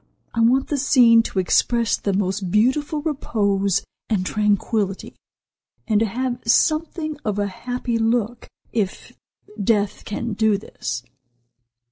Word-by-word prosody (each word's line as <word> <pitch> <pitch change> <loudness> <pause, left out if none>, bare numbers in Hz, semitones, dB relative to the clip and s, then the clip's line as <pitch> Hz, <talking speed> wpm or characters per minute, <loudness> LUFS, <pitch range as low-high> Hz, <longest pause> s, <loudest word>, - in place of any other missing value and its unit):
I 230 - -2
want 250 +4 +3
the 290 - 0
scene 240 -4 +6
to 225 - -6
express 230 +5 +2
the 200 - -2
most 190 -1 -1
beautiful 285 - +1
repose 200 - 0 0.3
and 200 -5 0
tranquillity, 205 -1 0 0.7
and 215 -2 +3
to 225 - +1
have 245 +3 -2
something 310 +5 +1
of 210 -2 -2
a 205 - +1
happy 240 +3 -3
look, 230 +1 0 0.3
if 205 -5 -3 0.5
death 205 -1 +1
can 225 +2 -4
do 215 -1 +2
this." 125 - -6
225 Hz, 125 wpm, -22 LUFS, 200-245 Hz, 0.7 s, scene